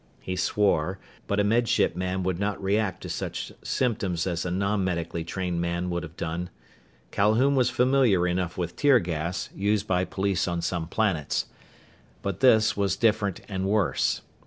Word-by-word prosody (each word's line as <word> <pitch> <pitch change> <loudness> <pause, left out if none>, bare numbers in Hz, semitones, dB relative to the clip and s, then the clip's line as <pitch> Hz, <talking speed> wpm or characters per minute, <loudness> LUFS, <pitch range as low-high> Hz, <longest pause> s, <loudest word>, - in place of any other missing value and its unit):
He 90 - -4
swore, 95 -1 +1 0.3
but 100 - 0
a - - +4
Med 115 +3 +2
Ship 120 -7 +2
man 90 +1 -2
would 90 -1 -1
not 100 0 -1
react 100 -1 0
to - - -5
such - - -4
symptoms 100 -9 -1
as 85 -2 -1
a - - -1
non 100 +2 0
medically 85 -2 -2
trained 90 0 -2
man 85 +1 -2
would 85 0 -1
have 85 -1 -10
done. 85 +2 -3 0.6
Calhoun 110 +7 +3
was 130 -3 +3
familiar 125 -7 +3
enough 90 0 -2
with 85 -2 -3
tear 145 -3 +5
gas, 85 -2 -3
used 105 +1 +1
by 90 -2 +1
police 95 0 -1
on 85 -1 -1
some 85 -3 -2
planets. 95 -6 0 0.8
But 100 -2 -3
this 110 -4 +5
was 100 -2 +1
different 105 -3 +1
and 95 -1 -2
worse. 105 -2 +1
95 Hz, 170 wpm, -26 LUFS, 85-105 Hz, 0.8 s, tear